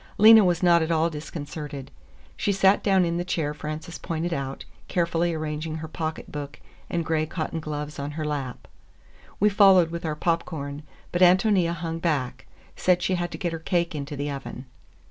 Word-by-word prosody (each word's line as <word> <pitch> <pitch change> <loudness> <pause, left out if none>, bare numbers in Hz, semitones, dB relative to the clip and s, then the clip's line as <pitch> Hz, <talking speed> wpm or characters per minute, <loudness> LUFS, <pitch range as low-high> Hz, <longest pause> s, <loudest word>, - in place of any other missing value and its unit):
Lena 220 +1 +9
was 175 -1 +1
not 170 -1 +5
at 160 - -1
all 165 0 +2
disconcerted. 150 -2 -7 0.4
She 205 - 0
sat 195 0 +4
down 190 -3 +4
in 170 0 -1
the 175 - -1
chair 160 -5 -1
Frances 155 +2 -6
pointed 165 0 -2
out, 135 -2 -4 0.2
carefully 170 -1 +1
arranging 155 0 -3
her 160 0 -5
pocketbook 155 -3 -5 0.3
and 170 -2 -1
gray 155 -1 0
cotton 160 0 -3
gloves 150 -1 -5
on 140 +1 -3
her 155 - -2
lap. 140 -4 -4 0.7
We 210 - +5
followed 195 -5 +6
with 170 0 -5
our 155 -2 -2
popcorn, 150 -3 -2 0.3
but 175 - -1
Ántonia 185 -1 +4
hung 165 0 -4
back—said 165 +3 -1
she 190 - +1
had 175 -1 -1
to - - -7
get 175 -2 -2
her 165 - -4
cake 170 0 0
into 145 0 -5
the 145 +1 -3
oven. 140 -1 -7
165 Hz, 175 wpm, -25 LUFS, 150-175 Hz, 0.7 s, Lena